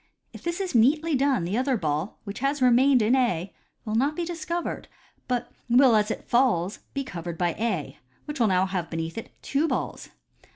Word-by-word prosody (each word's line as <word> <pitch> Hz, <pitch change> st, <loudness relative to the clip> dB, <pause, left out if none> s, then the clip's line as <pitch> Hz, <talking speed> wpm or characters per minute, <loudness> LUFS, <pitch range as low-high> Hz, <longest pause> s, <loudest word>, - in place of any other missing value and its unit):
If -, -, -10 dB
this 340 Hz, +1 st, -3 dB
is 380 Hz, -2 st, -3 dB
neatly 300 Hz, +8 st, +3 dB
done, 270 Hz, -7 st, +2 dB
the 190 Hz, +7 st, -1 dB
other 260 Hz, -1 st, +1 dB
ball, 155 Hz, +1 st, -2 dB
which 200 Hz, -1 st, -7 dB
has 275 Hz, +3 st, 0 dB
remained 255 Hz, 0 st, +5 dB
in 230 Hz, +5 st, +3 dB
A, 190 Hz, -8 st, 0 dB, 0.3 s
will 215 Hz, -, -3 dB
not 275 Hz, +7 st, +1 dB
be 345 Hz, -, -2 dB
discovered, 340 Hz, 0 st, -4 dB, 0.4 s
but 250 Hz, -2 st, -2 dB, 0.2 s
will 245 Hz, 0 st, +6 dB
as 210 Hz, 0 st, +2 dB
it -, -, -5 dB
falls 225 Hz, -7 st, +2 dB, 0.2 s
be 275 Hz, -, -1 dB
covered 170 Hz, -8 st, -6 dB
by 175 Hz, -1 st, +1 dB
A, 215 Hz, -9 st, -2 dB, 0.3 s
which 295 Hz, -1 st, -6 dB
will 230 Hz, -, +4 dB
now 185 Hz, -1 st, +3 dB
have 180 Hz, -3 st, -3 dB
beneath 165 Hz, 0 st, -4 dB
it 225 Hz, -, -6 dB
two 285 Hz, +4 st, +1 dB
balls. -, -, -3 dB
240 Hz, 195 wpm, -26 LUFS, 185-275 Hz, 0.4 s, will